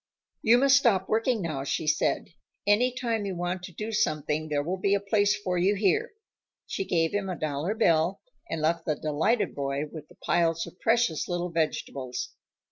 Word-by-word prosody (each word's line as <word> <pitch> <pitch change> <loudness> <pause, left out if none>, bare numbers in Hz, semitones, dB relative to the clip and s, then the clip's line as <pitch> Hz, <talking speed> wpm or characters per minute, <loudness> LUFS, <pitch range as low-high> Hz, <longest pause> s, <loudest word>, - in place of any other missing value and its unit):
"You 230 +2 +5
must 270 +1 +6
stop 205 -8 +2
working 225 -1 +1
now," 155 -5 -3
she 140 - -2
said. 150 - +1 0.4
"Any 220 +5 +4
time 235 -4 -2
you 190 - -3
want 175 +1 -2
to 180 - -8
do 215 +6 -5
something, 155 -5 0
there 145 -1 0
will 180 +5 -3
be 200 +2 +2
a - - +1
place 205 +1 +2
for 180 -3 -1
you 195 +4 +3
here." 195 - +1 0.5
She 195 - -3
gave 165 -3 +1
him 200 -2 -1
a 180 - -3
dollar 155 +6 -2
bill, 170 -4 +2 0.3
and 160 -1 -3
left 165 +2 +1
the 155 - +1
delighted 155 +11 0
boy 140 0 -2
with 155 -2 -9
the - - -19
piles 165 -1 +1
of 180 - -13
precious 225 -8 +1
little 175 0 -2
vegetables. 140 -5 -2
180 Hz, 190 wpm, -27 LUFS, 155-210 Hz, 0.5 s, must